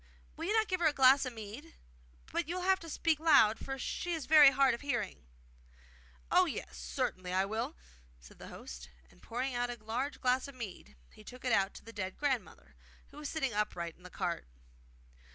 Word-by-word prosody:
Will 325 - -5
you 405 - 0
not 440 -1 +3
give 370 -2 -1
her 335 - +4
a 305 - +2
glass 265 0 +6
of 255 - -5
mead? 225 +9 -9 0.6
But 340 -2 -1
you 345 - -3
will 365 - -3
have 380 +1 +3
to 330 - -9
speak 320 0 +1
loud, 275 -9 +5
for 270 0 -5
she 350 +6 -3
is 315 - -5
very 300 -2 +9
hard 270 -1 +3
of 235 - -5
hearing.' 240 - -3 1.0
'Oh - - +5
yes, 70 - -5
certainly 65 - -3
I 190 +1 +2
will!' 220 - -3 0.4
said - - -16
the - - -9
host; 60 +1 -9 0.2
and, - - -22
pouring 255 +3 -3
out 245 0 -1
a 240 - -5
large 250 +6 -3
glass 255 +1 +1
of 280 - -11
mead, 200 - -8 0.2
he 215 - -15
took 250 +4 -11
it 250 - +1
out 195 -2 +2
to - - -11
the 230 - -10
dead 190 -3 -4
grandmother, 270 -5 -2 0.4
who - - -14
was 300 -1 -5
sitting 270 -7 -1
upright 175 -5 -2
in - - -24
the 180 - -11
cart. 170 - -3
250 Hz, 210 wpm, -33 LUFS, 205-295 Hz, 1.0 s, very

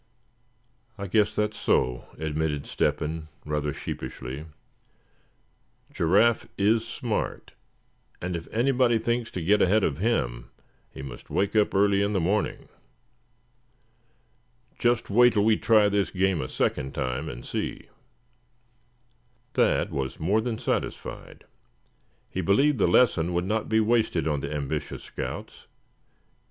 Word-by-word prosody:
"I 100 - -5
guess 105 +2 +2
that's 105 0 -1
so," 65 -1 +1
admitted 80 -2 -2
Step - - 0
hen, 80 +1 -4 0.2
rather 75 -1 -1
sheepishly. 65 +2 -6 1.5
"Giraffe 105 +8 +3
is 110 +3 +3
smart, 115 -2 -3 0.7
and 90 0 -3
if 80 -1 -6
anybody 125 0 +3
thinks 120 +1 -1
to 90 - -5
get 105 +5 +3
ahead 100 +3 +4
of 70 0 0
him - - -1 0.4
he 65 - -9
must 65 -3 -9
wake 100 +2 0
up 105 -2 +3
early 100 0 +4
in 100 +1 0
the 95 - +2
morning. 100 +5 -1 2.1
Just 120 -3 +1
wait 120 +3 +6
till 105 -1 +2
we 110 0 +5
try 110 -1 +4
this 100 -3 +1
game 95 -3 +1
a 65 - -5
second 65 +1 -1
time, 65 +2 -2
and - - -8
see." - - -4 1.7
Thad - - +2
was 65 -1 -3
more 100 +7 +2
than 115 -1 -2
satisfied. - - -4 0.8
He 95 - -3
believed 125 - +3
the - - +4
lesson 90 -4 +3
would 85 +1 0
not 110 +3 -1
be 110 0 +3
wasted 110 -7 +1
on 75 -2 0
the - - -5
ambitious 75 0 -4
scouts. - - -7
100 Hz, 130 wpm, -26 LUFS, 75-110 Hz, 2.1 s, wait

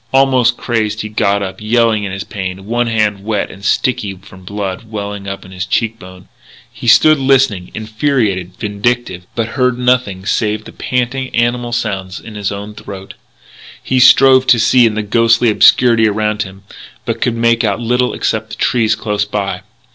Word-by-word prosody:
Almost 130 -3 +3
crazed, 110 -3 -2
he 110 - -6
got 100 -1 0
up, 95 +2 -7
yelling 110 -1 +2
in 100 - -4
his 95 +1 -5
pain, 95 -2 -6
one 120 +2 0
hand 105 -3 0
wet 105 -1 -2
and 95 - -14
sticky 100 -2 0
from 95 0 -16
blood 100 +1 -5
welling 100 -2 -6
up 100 0 -6
from 95 - -14
his 90 -1 -4
cheek 115 +4 -1
bone. 90 0 -13 0.5
He 120 +1 -8
stood 155 +6 +6
listening, 130 -9 +2
infuriated, 110 - -1
vindictive, 105 -3 -2
but 115 -1 -2
heard 125 -1 0
nothing 125 -7 0
save 110 +1 -1
the - - -10
panting, 130 +1 -2
animal 120 0 0
sounds 100 -5 -3
in 110 - -11
his 105 -2 -3
own 100 +1 -7
throat. 95 -2 -10 0.7
He 130 - 0
strove 130 +1 +6
to 120 - +6
see 120 +2 +4
in 110 - -2
the 110 - -2
ghostly 115 +2 +3
obscurity 115 +1 +5
around 105 0 -1
him, 95 0 -7 0.4
but 115 0 -3
could 120 -2 0
make 115 0 +2
out 100 -2 0
little 125 +1 0
except 110 -1 -2
the - - -7
trees 115 -3 +1
close 105 -1 -2
by. 105 -1 -3
110 Hz, 175 wpm, -15 LUFS, 100-120 Hz, 0.7 s, stood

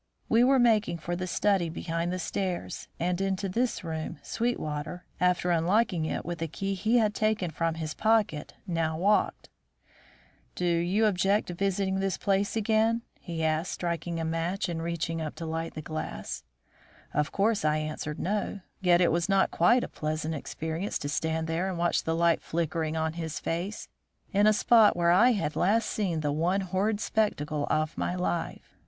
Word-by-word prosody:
We 230 +2 +4
were 265 +2 +5
making 220 -7 +3
for 175 +2 -3
the 185 +1 -3
study 185 0 +1
behind 165 +1 -2
the 185 - -2
stairs, 185 0 -3
and 180 +2 0
into 195 0 -1
this 235 +5 -1
room 160 -2 -4
Sweetwater, 175 -7 -3
after 180 0 +2
unlocking 175 +1 +2
it - - -3
with 170 -1 -5
a 165 - 0
key 195 +5 -3
he 220 +5 +2
had 215 -3 +3
taken 215 -5 0
from 165 +1 -1
his 155 -2 -4
pocket, 215 -9 +1
now 165 -3 -1
walked: 205 +5 +1 1.1
"Do 180 - -2
you 175 +5 +2
object 200 0 +2
to - - -3
visiting 190 +1 0
this 195 -2 0
place 200 +1 0
again?" 225 +1 +2 0.2
he 165 -2 -4
asked, 160 +2 0
striking 170 -1 -3
a 165 - -2
match 165 +4 -1
and 165 -2 -3
reaching 165 -1 -2
up 155 -1 -4
to 165 - -6
light 165 +1 -3
the 155 - -5
gas. 155 +2 -5 0.7
Of 150 0 0
course 210 0 +1
I 155 0 +2
answered 155 0 -4
no, 205 0 -2 0.2
yet 180 -2 +4
it 175 - +4
was 170 +3 0
not 195 -1 +3
quite 235 +9 +4
a - - -3
pleasant 155 +1 -3
experience 160 +5 -3
to 145 - -4
stand 160 +2 -1
there 165 +4 -1
and 185 - -3
watch 170 0 +1
the 165 - 0
light 170 0 +3
flickering 160 -1 -2
on 160 0 0
his 160 -2 -4
face, 180 +6 -3 0.5
in 205 +2 +4
a - - +7
spot 215 -2 +5
where 170 0 +3
I 240 +8 +6
had 195 -8 -2
last 215 +4 +2
seen 180 -7 -1
the 145 -1 0
one 175 +6 +1
horrid 195 +3 0
spectacle 155 -11 0
of 155 +1 0
my 180 - -1
life. 175 -2 -3
175 Hz, 180 wpm, -28 LUFS, 160-200 Hz, 1.1 s, a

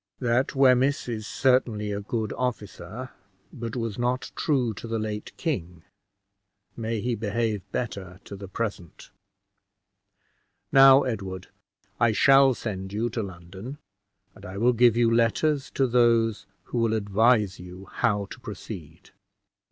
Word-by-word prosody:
That 125 +2 +1
Wemyss 135 +1 +3
is 110 -3 -4
certainly 120 -5 +1
a 100 0 -3
good 110 0 -3
officer, 120 -1 -5 0.4
but 115 0 -6
was 115 -2 -3
not 125 +1 -1
true 130 -7 0
to 110 - -8
the 115 0 -2
late 105 -1 -4
king: 90 - -3 0.9
may 115 -1 -3
he 125 +2 -1
behave 110 -1 -1
better 95 -6 -4
to 100 - -9
the 100 0 -9
present! 95 -4 -5 1.6
Now, 135 0 +8
Edward, 95 -6 -5 0.5
I 115 -2 +3
shall 135 +2 +6
send 95 -3 -5
you 110 +3 -1
to 115 - -2
London, 95 +7 -8 0.6
and - - -17
I 95 +1 -7
will 120 +4 +3
give 120 -1 +4
you 115 -1 +3
letters 135 +5 +1
to 135 - +3
those 115 -3 +2 0.2
who 120 - -3
will 115 -1 +2
advise 105 0 +2
you 90 +2 -10
how 105 -2 0
to - - -9
proceed. 90 -7 -9
115 Hz, 135 wpm, -26 LUFS, 100-125 Hz, 1.6 s, Now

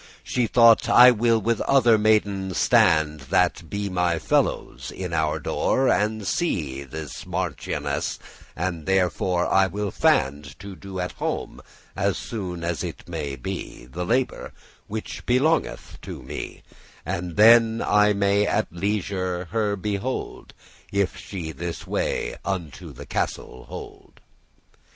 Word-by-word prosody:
She 125 -2 0
thought, 115 -1 +5
"I 125 +1 +9
will 115 0 +2
with 115 +1 0
other 130 -4 +4
maidens 100 -3 +1
stand, 80 -10 +3
That - - +1
be 100 0 -3
my 90 -3 0
fellows, - - -1
in 90 -2 -6
our 80 -1 0
door, 130 - +1
and 105 0 0
see 75 - -1
The 75 +3 -7 0.2
marchioness; 70 -2 -3 0.4
and 85 -2 -3
therefore 90 -1 +1 0.3
will 105 +2 -2
I - - -9
fand* 70 +2 +2
*strive 65 - -13
To 100 0 -9
do 95 0 -8
at 90 0 -2
home, - - -4 0.3
as - - 0
soon 90 -6 -5
as 85 -1 -2
it - - -7
may 75 -5 -4
be, 60 -1 -6
The 80 +8 -5
labour 125 +7 -1 0.3
which 110 +1 -6
belongeth 140 +7 +1
unto - - -8
me, - - -7 0.4
And 90 0 -4
then 115 +1 +6
I 105 0 +4
may 100 +1 +2
at - - 0
leisure 95 -1 -2
her 105 -2 0
behold, 105 +6 -4 0.4
If 100 -1 0
she 85 -5 -6
this 85 +3 -6
way - - -2
unto 95 -6 -5
the - - -10
castle 65 - -4
hold." - - -10
95 Hz, 135 wpm, -24 LUFS, 85-110 Hz, 0.4 s, I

